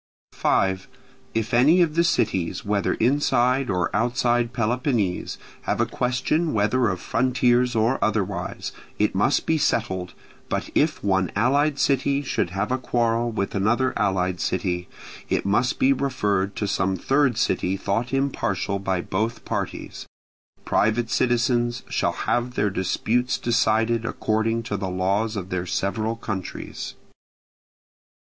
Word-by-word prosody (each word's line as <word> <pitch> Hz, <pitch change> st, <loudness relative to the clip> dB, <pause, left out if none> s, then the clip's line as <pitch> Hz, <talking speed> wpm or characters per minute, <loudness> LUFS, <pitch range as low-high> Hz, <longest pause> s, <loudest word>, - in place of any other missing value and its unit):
5. 95 Hz, -1 st, +1 dB, 0.5 s
If 110 Hz, -1 st, -1 dB
any 150 Hz, +9 st, +6 dB
of 160 Hz, -3 st, -1 dB
the 170 Hz, +1 st, +3 dB
cities, 95 Hz, -, 0 dB
whether 100 Hz, -1 st, 0 dB
inside 125 Hz, 0 st, +2 dB
or 90 Hz, -1 st, 0 dB
outside 120 Hz, +1 st, +1 dB
Peloponnese, 120 Hz, -5 st, -1 dB, 0.3 s
have -, -, 0 dB
a -, -, +3 dB
question 130 Hz, +6 st, 0 dB
whether 110 Hz, +3 st, +2 dB
of 95 Hz, -1 st, -2 dB
frontiers 125 Hz, 0 st, +2 dB
or 115 Hz, +4 st, +1 dB
otherwise, 100 Hz, -4 st, -2 dB, 0.3 s
it 105 Hz, -, +1 dB
must 105 Hz, +9 st, +2 dB
be 160 Hz, -1 st, +1 dB
settled, 95 Hz, -9 st, -1 dB, 0.3 s
but -, -, -2 dB
if 155 Hz, 0 st, +1 dB
one 95 Hz, -2 st, +1 dB
allied 140 Hz, +4 st, +2 dB
city 140 Hz, +1 st, +1 dB
should 125 Hz, -, -1 dB
have 100 Hz, +6 st, -2 dB
a 130 Hz, -, +1 dB
quarrel 120 Hz, -1 st, 0 dB
with 100 Hz, -3 st, -2 dB
another 120 Hz, +6 st, +1 dB
allied 90 Hz, -2 st, 0 dB
city, 90 Hz, -1 st, -1 dB, 0.4 s
it -, -, 0 dB
must 120 Hz, +5 st, +1 dB
be 135 Hz, +1 st, +4 dB
referred 105 Hz, -8 st, -1 dB
to 105 Hz, -, -2 dB
some 95 Hz, -1 st, 0 dB
third 135 Hz, +3 st, +2 dB
city 95 Hz, +2 st, 0 dB
thought 110 Hz, +5 st, -1 dB
impartial 105 Hz, -8 st, -1 dB
by 95 Hz, -2 st, -1 dB
both 110 Hz, +7 st, -2 dB
parties. -, -, -4 dB, 0.6 s
Private 115 Hz, +1 st, +1 dB
citizens 120 Hz, -1 st, +1 dB
shall -, -, 0 dB
have 120 Hz, +1 st, 0 dB
their 100 Hz, 0 st, +1 dB
disputes 115 Hz, +7 st, 0 dB
decided 115 Hz, -1 st, +1 dB
according 115 Hz, 0 st, -1 dB
to 105 Hz, -3 st, -3 dB
the 95 Hz, -1 st, -3 dB
laws 100 Hz, +5 st, 0 dB
of 95 Hz, -2 st, -5 dB
their 90 Hz, -1 st, -2 dB
several 110 Hz, +5 st, -1 dB
countries. 100 Hz, -5 st, -6 dB
115 Hz, 135 wpm, -24 LUFS, 100-125 Hz, 0.6 s, any